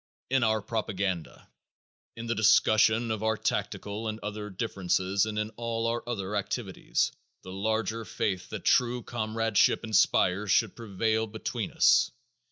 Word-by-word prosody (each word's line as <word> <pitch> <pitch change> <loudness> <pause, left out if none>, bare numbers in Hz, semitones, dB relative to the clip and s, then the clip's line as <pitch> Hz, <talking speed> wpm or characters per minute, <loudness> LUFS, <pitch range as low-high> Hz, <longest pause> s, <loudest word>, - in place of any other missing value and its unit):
In 135 0 +3
our 110 -2 +1
propaganda, 100 -6 -3 0.7
in 115 - -6
the 115 - 0
discussion 110 +1 +4
of 110 -1 -2
our 110 0 +1
tactical 105 +1 -3
and 110 0 -4
other 105 0 -5
differences 95 0 0
and 105 -1 -4
in 105 0 -2
all 115 -1 -2
our 115 +1 0
other 105 -3 -3
activities, - - -1 0.3
the 95 - -8
larger 110 +3 -1
faith 95 -3 -3
that 105 -4 -7
true 125 -1 +3
comradeship 115 -2 +1
inspires 105 -2 +2
should 110 +1 +3
prevail 110 0 -1
between 110 +1 -4
us. - - +4
110 Hz, 140 wpm, -28 LUFS, 100-115 Hz, 0.7 s, discussion